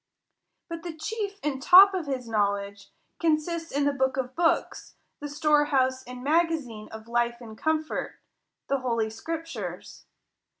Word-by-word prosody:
But 335 -1 -6
the 335 -2 -6
chief 405 +4 -4
and 275 -3 -2
top 380 +6 +9
of 355 -5 -3
his 255 -3 -3
knowledge 200 -2 -1 0.3
consists 330 +1 0
in 285 +1 0
the 285 - +2
book 265 -1 0
of 255 -1 -3
books, 330 -1 0 0.2
the 290 - -6
storehouse 290 -3 +2
and 250 0 -9
magazine 295 -8 0
of 220 0 -10
life 235 0 0
and 225 -3 -10
comfort, 315 +4 -2 0.5
the 275 - 0
holy 230 -4 -1
scriptures. 325 +9 -6
280 Hz, 140 wpm, -27 LUFS, 240-325 Hz, 0.5 s, top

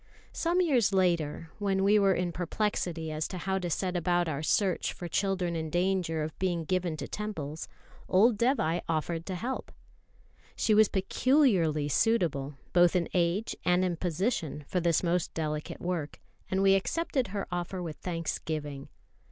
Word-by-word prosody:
Some 345 +2 +1
years 260 - +3
later, 165 -3 +1
when 195 -2 +1
we 210 +2 +5
were 195 -2 +4
in 175 -1 -1
perplexity 175 -3 -2
as 155 0 -2
to 185 - -6
how 190 +2 -1
to 180 -2 -3
set 180 +3 -1
about 175 0 +1
our 145 -2 -2
search 185 +3 +1
for 175 - -7
children 185 -1 0
in 160 -1 -3
danger 175 -2 0
of 155 - -5
being 175 -3 0
given 180 -2 -1
to - - -5
temples, 160 -8 -5 0.4
old 215 +5 +5
Dévai 205 - +1
offered 165 +1 -2
to 190 - -3
help. 250 +9 -4 0.8
She 220 - +2
was 215 -1 +6
peculiarly 190 - +2
suitable, 150 -7 +1 0.2
both 175 0 +5
in 175 -2 +1
age 180 +5 +1
and 180 +1 +3
in 180 -2 0
position, 170 - -2
for 180 - 0
this 170 -1 +2
most 175 0 0
delicate 150 -1 -3
work; 175 -4 -3 0.3
and 190 +1 +1
we 195 0 +6
accepted 260 - 0
her 200 0 -3
offer 175 +1 -3
with 165 -4 -5
thanksgiving. 155 -4 -4
180 Hz, 160 wpm, -29 LUFS, 160-195 Hz, 0.8 s, was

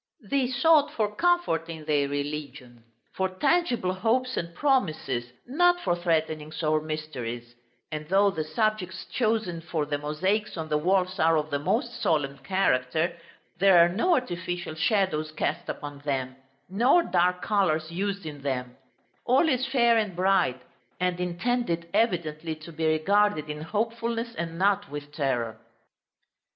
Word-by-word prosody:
They 275 -2 +2
sought 290 +4 +4
for 210 -2 -1
comfort 345 - +1
in 160 -2 -7
their 145 -2 +2
religion, 140 -4 -5 0.3
for 190 0 0
tangible 250 - +1
hopes 245 +6 0
and 170 0 -4
promises, 155 - 0
not 355 +7 +3
for 175 - +1
threatenings 160 -2 -1
or 155 0 +2
mysteries; 130 -7 -5 0.4
and 155 0 -5
though 200 +1 +4
the 160 -4 -3
subjects 185 0 -1
chosen 215 -8 -1
for 160 -2 -2
the 145 0 -2
mosaics 185 +9 -1
on 160 -1 -4
the 150 - +2
walls 185 +3 +1
are 165 0 +4
of 155 0 -2
the 145 - 0
most 240 - -1
solemn 140 -3 0
character, 165 -3 +1 0.4
there 195 -1 +6
are 170 0 +7
no 285 - +2
artificial 175 -7 -3
shadows 160 -3 0
cast 155 - -2
upon 145 -1 -6
them, 135 -3 -2 0.3
nor 245 - +4
dark 180 - +1
colors 165 -6 +1
used 200 +1 -3
in 145 -2 -7
them: 125 -3 -3 0.5
all 260 +7 +4
is 260 -3 +1
fair 235 -4 +4
and 210 -5 -2
bright, 180 -8 +2 0.4
and 180 0 0
intended 180 0 -1
evidently 170 -7 0
to 155 +2 -11
be 160 0 -1
regarded 155 0 +2
in 150 0 -7
hopefulness, 230 +5 -2
and 165 -4 -5
not 200 +2 +2
with 145 0 -7
terror. 125 -7 -2
175 Hz, 145 wpm, -27 LUFS, 155-215 Hz, 0.5 s, are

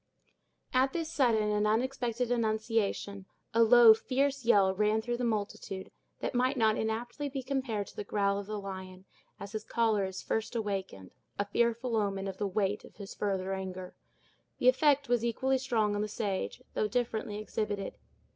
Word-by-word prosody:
At 260 +1 +3
this 330 -1 -3
sudden 225 -8 +2
and 210 0 +2
unexpected 245 +1 0
annunciation, 220 -3 -1 0.3
a 230 - +4
low, 230 0 +9
fierce 270 +4 0
yell 200 -5 +4
ran 210 +2 +2
through 240 +2 -2
the 250 - -3
multitude, 205 -4 -3 0.3
that - - -2
might 255 +2 +1
not 220 -2 +3
inaptly 240 +6 -3
be 270 -1 -4
compared 255 -6 -2
to - - -14
the - - -4
growl 200 -1 0
of 200 - -7
the 215 0 -3
lion, 190 -1 -8 0.3
as 200 0 -7
his 215 -1 -4
choler 220 -3 +1
is 190 0 -6
first 220 +2 -2
awakened—a 195 - -4
fearful 235 +3 0
omen 200 -2 0
of 190 -1 -5
the 205 - -1
weight 200 +1 -1
of - - -15
his 200 -2 -8
future 195 -2 -1
anger. 185 -1 -5 0.6
The 250 - +5
effect 280 +1 +3
was 240 -1 +2
equally 260 +3 +1
strong 225 -5 +1
on 205 - -1
the 210 - -1
sage, 195 - -3
though 215 - +1
differently 220 -3 -2
exhibited. 210 -2 -3
220 Hz, 170 wpm, -31 LUFS, 200-245 Hz, 0.6 s, low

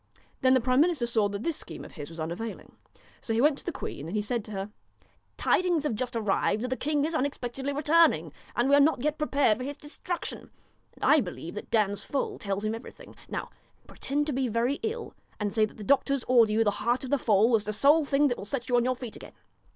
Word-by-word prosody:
Then 260 0 +5
the - - +5
prime 255 +2 +3
minister 320 -7 +2
saw 220 -3 +1
that 200 +2 -5
this 335 - 0
scheme - - -8
of - - -11
his 145 -3 -8
was 165 0 -11
unavailing. 170 +8 -5 0.5
So 225 - -2
he - - +1
went 285 +2 +3
to - - -12
the 350 - -3
queen 145 - -6
and 175 - -5
he 210 - +1
said 230 +1 -2
to 215 - -9
her: 195 0 -5 0.7
'Tidings 350 -4 +2
have 295 - 0
just 245 +3 -3
arrived 215 0 +1
that 250 - -2
the 260 - 0
king 290 +3 0
is 325 - -3
unexpectedly 270 -2 -2
returning; 290 - +3 0.2
and 240 +2 +2
we 280 - +6
are - - +6
not 285 -3 +3
yet 300 +1 0
prepared 280 -7 +2
for - - -4
his 285 +2 -5
destruction; 335 +4 -6 0.5
and - - -4
I - - +6
believe - - -6
that - - -7
Dan's 205 -2 +1
foal 280 - -3
tells 200 +1 -3
him 215 - 0
everything. 225 +2 -10
Now - - -4 0.3
pretend 290 +2 -2
to 300 - -2
be 260 0 0
very 235 +5 0
ill, 450 +1 -4 0.3
and 205 -2 -2
say 220 -1 +4
that 215 - -12
the 215 - -7
doctors 275 +1 +2
order 235 -4 +4
you 220 +1 +3
the 205 - +2
heart 240 +4 +1
of 260 - -6
the 285 - +3
foal 220 +1 +3
as 215 -2 +3
the 210 - -1
sole 285 +9 +4
thing 285 +1 +3
that 245 - -2
will - - -6
set 245 +3 -4
you 245 - +4
on 240 - +3
your 255 0 +1
feet 245 -3 -8
again.' - - -11
250 Hz, 245 wpm, -28 LUFS, 215-285 Hz, 0.7 s, we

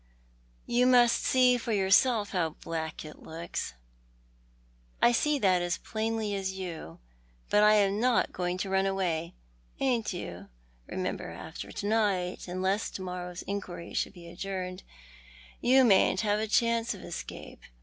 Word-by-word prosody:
You 245 +1 +3
must 245 -2 +5
see 250 -1 +4
for 230 -1 -2
your 190 -2 +1
self 220 -2 +4
how 165 -4 -1
black 160 -1 -4
it 155 - -11
looks." 165 - -5 1.2
"I 240 - +5
see 295 +5 +2
that 185 -7 +3
as 175 -1 -1
plainly 220 -1 -2
as 190 -1 -2
you, 170 - -7 0.5
but 210 - +5
I 210 0 +6
am 200 0 +3
not 245 0 +2
going 180 0 -2
to 190 +1 -3
run 190 0 +2
away." 175 -4 -1 0.4
"Ain't 245 -5 +1
you? 135 - -7 0.4
Remember - - -3
after - - -8
to - - -5
night, 200 -5 0
unless 190 +3 -1
to 190 - -7
morrow's 180 -1 -5
inquiry 185 -4 -5
should - - -1
be 175 -3 -12
adjourned, 185 +1 -5 0.8
you 260 +2 +5
mayn't 190 -3 +4
have 210 -1 +1
a 220 - -1
chance 230 +1 +2
of 195 - -11
escape. 175 - -8
195 Hz, 150 wpm, -29 LUFS, 180-225 Hz, 1.2 s, I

